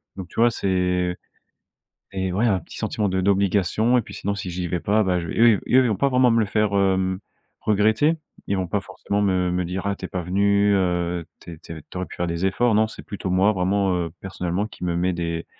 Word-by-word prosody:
donc, 95 Hz, -2 st, -7 dB
tu -, -, -7 dB
vois? 120 Hz, -, +6 dB
C'est 90 Hz, -3 st, 0 dB, 1.0 s
et 95 Hz, -1 st, -2 dB
ouais, 105 Hz, +6 st, +1 dB
heu, 115 Hz, -, +3 dB
un 95 Hz, -, +2 dB
petit -, -, -12 dB
sentiment 105 Hz, -2 st, -1 dB
d' 95 Hz, -, -1 dB
d'obligation 100 Hz, +4 st, +2 dB
et -, -, +3 dB
puis -, -, -12 dB
sinon 100 Hz, -, -2 dB
si 100 Hz, -2 st, -5 dB
j'y 90 Hz, 0 st, -3 dB
vais 90 Hz, 0 st, -2 dB
pas, 105 Hz, +6 st, +2 dB
bah, 90 Hz, -2 st, +1 dB
je 85 Hz, -, -5 dB
vais -, -, -5 dB
et -, -, -2 dB, 0.2 s
eux -, -, -4 dB
et -, -, +2 dB
eux 130 Hz, -, +5 dB
ils -, -, +2 dB
vont 105 Hz, -, +1 dB
pas 140 Hz, +9 st, +1 dB
vraiment 125 Hz, -2 st, +4 dB
me 115 Hz, -, +3 dB
le 110 Hz, -, +2 dB
faire, 105 Hz, 0 st, 0 dB
hem, 95 Hz, -1 st, +1 dB, 0.4 s
regretter 110 Hz, +10 st, +2 dB, 0.3 s
ils 100 Hz, -, 0 dB
vont 95 Hz, -1 st, -2 dB
pas 100 Hz, +3 st, -1 dB
forcément 100 Hz, +2 st, -3 dB
me 95 Hz, -3 st, +1 dB
me 90 Hz, 0 st, 0 dB
dire: 90 Hz, +3 st, -4 dB
«Ah, 100 Hz, -, 0 dB
tu 95 Hz, -, -7 dB
es -, -, -4 dB
pas 90 Hz, -, -4 dB
venu 100 Hz, +3 st, +2 dB
heu, 90 Hz, -2 st, 0 dB
t 85 Hz, -2 st, -10 dB
t 80 Hz, -2 st, -9 dB
tu -, -, -8 dB
aurais 90 Hz, -, -2 dB
pu -, -, -10 dB
faire 90 Hz, -, -2 dB
des 85 Hz, +2 st, -2 dB
efforts» 110 Hz, +5 st, +2 dB
non, 110 Hz, +1 st, +3 dB
c'est -, -, -10 dB
plutôt 100 Hz, -2 st, -5 dB
moi 95 Hz, +3 st, +3 dB
vraiment, 95 Hz, 0 st, +1 dB
heu, 85 Hz, -2 st, -2 dB
personnellement, 90 Hz, +1 st, -2 dB
qui 105 Hz, -, -11 dB
me 85 Hz, -1 st, -1 dB
met 90 Hz, +2 st, +1 dB
des, 85 Hz, -1 st, -3 dB
95 Hz, 260 wpm, -23 LUFS, 90-105 Hz, 1.0 s, vois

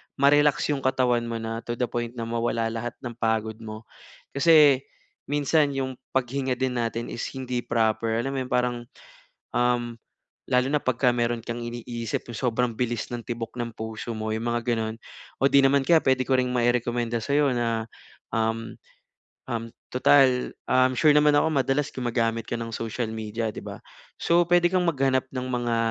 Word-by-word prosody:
ma-relax 145 Hz, +1 st, +3 dB
'yong 140 Hz, -, 0 dB
katawan 125 Hz, -3 st, +1 dB
mo 115 Hz, -, -3 dB
na, 115 Hz, 0 st, -3 dB
to 120 Hz, 0 st, -5 dB
the 125 Hz, +1 st, 0 dB
point 120 Hz, 0 st, -3 dB
na 115 Hz, -, -4 dB
mawala 115 Hz, 0 st, -1 dB
lahat 115 Hz, +1 st, -4 dB
ng 120 Hz, -, -5 dB
pagod 110 Hz, -1 st, -1 dB
mo. 110 Hz, 0 st, -8 dB, 0.5 s
Kasi 145 Hz, -2 st, +6 dB, 0.5 s
minsan 145 Hz, 0 st, +2 dB
'yong 130 Hz, -1 st, -3 dB, 0.2 s
paghinga 130 Hz, 0 st, 0 dB
din 125 Hz, -1 st, -1 dB
natin 115 Hz, 0 st, -3 dB
is 120 Hz, -, -4 dB
hindi 125 Hz, -2 st, -3 dB
proper, 115 Hz, -1 st, 0 dB
alam 135 Hz, -, -2 dB
mo 135 Hz, -, -2 dB
'yong -, -, -20 dB
parang, 125 Hz, 0 st, +1 dB, 0.8 s
um, 120 Hz, -1 st, +1 dB, 0.5 s
lalo 125 Hz, 0 st, +3 dB
na 150 Hz, +1 st, +1 dB
'pagka 125 Hz, 0 st, +2 dB
meron 120 Hz, -1 st, -1 dB
kang 120 Hz, 0 st, -4 dB
iniisip 120 Hz, -1 st, -4 dB
yung -, -, -6 dB
sobrang 125 Hz, -1 st, 0 dB
bilis 120 Hz, -1 st, -2 dB
ng 120 Hz, -, -3 dB
tibok 115 Hz, -1 st, -5 dB
ng 120 Hz, -1 st, -2 dB
puso 110 Hz, +1 st, -6 dB
mo 110 Hz, 0 st, -3 dB
'yong 110 Hz, +1 st, -3 dB
mga 120 Hz, 0 st, 0 dB
gano'n. 110 Hz, 0 st, -3 dB, 0.5 s
O -, -, +4 dB
'di 140 Hz, 0 st, +5 dB
naman 135 Hz, 0 st, +3 dB
kaya 165 Hz, -2 st, +5 dB
puwede 130 Hz, -1 st, +2 dB
ko 135 Hz, -, 0 dB
ring 125 Hz, 0 st, +1 dB
mairekomenda 120 Hz, -1 st, 0 dB
sa'yo 140 Hz, +2 st, +2 dB
na, 115 Hz, -2 st, -1 dB, 0.5 s
um, 115 Hz, 0 st, -1 dB, 0.8 s
um, 115 Hz, -1 st, -3 dB, 0.2 s
total, 130 Hz, -1 st, +4 dB, 0.2 s
um, 130 Hz, 0 st, +4 dB
sure 150 Hz, +3 st, +5 dB
naman 150 Hz, 0 st, +5 dB
ako 160 Hz, +1 st, +2 dB
madalas 135 Hz, +2 st, +1 dB
gumagamit 115 Hz, -2 st, -1 dB
ka 120 Hz, -, -2 dB
ng 115 Hz, -1 st, -5 dB
social 115 Hz, 0 st, -3 dB
media 110 Hz, 0 st, -3 dB
'di -, -, -7 dB
ba. -, -, -7 dB, 0.4 s
So, 170 Hz, +1 st, +3 dB
puwede 175 Hz, 0 st, +4 dB
kang 180 Hz, -1 st, +2 dB
maghanap 135 Hz, -3 st, +1 dB
ng 130 Hz, -1 st, -4 dB
mga, 120 Hz, -1 st, 0 dB
120 Hz, 175 wpm, -25 LUFS, 115-135 Hz, 0.8 s, Kasi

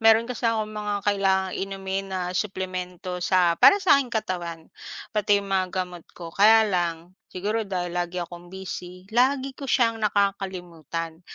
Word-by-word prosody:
Meron 225 Hz, +1 st, +6 dB
kasi 240 Hz, -1 st, -1 dB
akong 215 Hz, -1 st, -1 dB
mga 210 Hz, -1 st, -3 dB
kailangang 190 Hz, -2 st, +1 dB
inumin 195 Hz, 0 st, -3 dB
na 190 Hz, -1 st, -3 dB
suplemento 185 Hz, -2 st, -4 dB
sa 180 Hz, -1 st, +3 dB
para 400 Hz, -, +8 dB
sa 375 Hz, -8 st, +5 dB
aking 265 Hz, -, -4 dB
katawan 180 Hz, -8 st, -4 dB, 0.4 s
pati 205 Hz, -1 st, +2 dB
mga 190 Hz, -1 st, 0 dB
gamot 180 Hz, -2 st, -4 dB
ko. 170 Hz, -2 st, -8 dB
Kaya 220 Hz, +4 st, +6 dB
lang 175 Hz, -3 st, -2 dB, 0.2 s
siguro 210 Hz, +3 st, -2 dB
dahil 175 Hz, -2 st, -2 dB
lagi 175 Hz, +1 st, -4 dB
akong 175 Hz, +1 st, -12 dB
busy, 185 Hz, -1 st, -8 dB
lagi 265 Hz, +3 st, +2 dB
ko 275 Hz, +1 st, -8 dB
siyang 230 Hz, -4 st, +2 dB
nakakalimutan. 180 Hz, -6 st, -2 dB
190 Hz, 150 wpm, -25 LUFS, 180-215 Hz, 0.4 s, para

